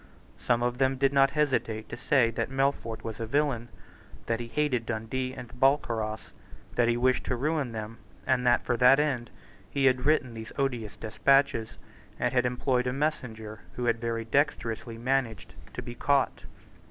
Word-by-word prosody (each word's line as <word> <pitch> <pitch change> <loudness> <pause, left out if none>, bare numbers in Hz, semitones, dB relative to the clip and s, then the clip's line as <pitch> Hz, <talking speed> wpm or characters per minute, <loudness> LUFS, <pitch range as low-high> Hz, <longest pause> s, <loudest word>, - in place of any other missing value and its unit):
Some 120 -1 +1
of 125 +1 -1
them 135 0 +3
did 135 +1 +2
not 135 0 +5
hesitate 115 -7 0
to - - -5
say 120 -1 +2
that 115 - -2
Melfort 135 -4 -1
was 110 -2 -6
a 115 - -3
villain, 135 -3 0 0.6
that 115 0 -1
he 120 - -5
hated 125 -3 0
Dundee 125 +3 -3
and 125 -3 -8
Balcarras, 120 -5 0 0.4
that 120 - +2
he 120 0 +2
wished 130 +1 +2
to 125 - -1
ruin 145 0 -1
them, 110 0 -6 0.3
and 130 -2 +2
that, 120 -1 +3
for 120 - +1
that 125 +3 +6
end, 135 -6 0 0.4
he 140 -1 0
had 130 0 +3
written 145 -6 +2
these 110 0 -8
odious 120 -7 -2
despatches, 115 0 +2 0.4
and - - 0
had 125 -1 +3
employed 125 0 0
a 125 - 0
messenger 115 -7 -3
who 125 - -3
had 115 -1 +1
very 115 -1 -2
dexterously 115 -4 -1
managed 125 -1 -1 0.2
to - - -5
be 120 - -7
caught. 140 +2 +1
125 Hz, 175 wpm, -28 LUFS, 115-135 Hz, 0.6 s, that